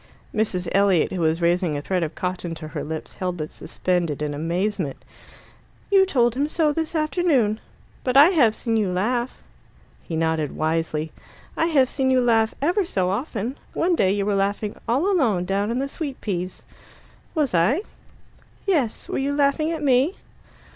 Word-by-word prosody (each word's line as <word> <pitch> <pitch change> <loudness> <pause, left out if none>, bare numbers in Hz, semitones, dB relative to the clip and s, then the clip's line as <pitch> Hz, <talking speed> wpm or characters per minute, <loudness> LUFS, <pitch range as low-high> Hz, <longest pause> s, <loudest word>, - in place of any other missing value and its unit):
Mrs. 185 -5 0
Elliot, 195 -4 +3
who 185 - -2
was 160 +1 +1
raising 170 -3 +2
a - - -4
thread 185 +1 0
of 160 -1 -3
cotton 180 -2 -3
to 155 -1 -8
her - - -4
lips, 160 +1 -6
held 180 -2 -3
it 155 - -4
suspended 170 -2 -2
in 150 -1 -2
amazement. 170 +1 -2 0.9
"You 385 -1 +6
told 240 -9 +2
him 280 +4 0
so 310 -2 +2
this 320 +2 -3
afternoon. 305 - +1 0.4
But 255 0 +2
I 290 +5 +9
have 260 - +4
seen 225 -1 -1
you 205 -4 +1
laugh." 235 +7 -1 0.6
He 165 - -6
nodded 160 -2 0
wisely. 160 -1 -1 0.4
"I 325 - +1
have 280 -6 +4
seen 265 0 0
you 260 -1 +4
laugh 225 -2 +2
ever 360 +7 +2
so 185 - 0
often. 235 +2 -3
One 350 +2 +1
day 190 - +3
you 200 0 0
were 205 - +1
laughing 200 +1 -1
alone 340 - +2
all 215 -8 +2
down 195 +3 -1
in 235 - -1
the 275 +1 -1
sweet 280 -2 -5
peas." 185 -3 -4 0.7
"Was 295 - +1
I?" 215 - +3 0.8
"Yes. 300 - 0
Were - - -2
you 280 +1 -1
laughing 285 +2 +2
at 320 -2 -3
me?" 275 +6 +3
215 Hz, 175 wpm, -23 LUFS, 175-280 Hz, 0.9 s, I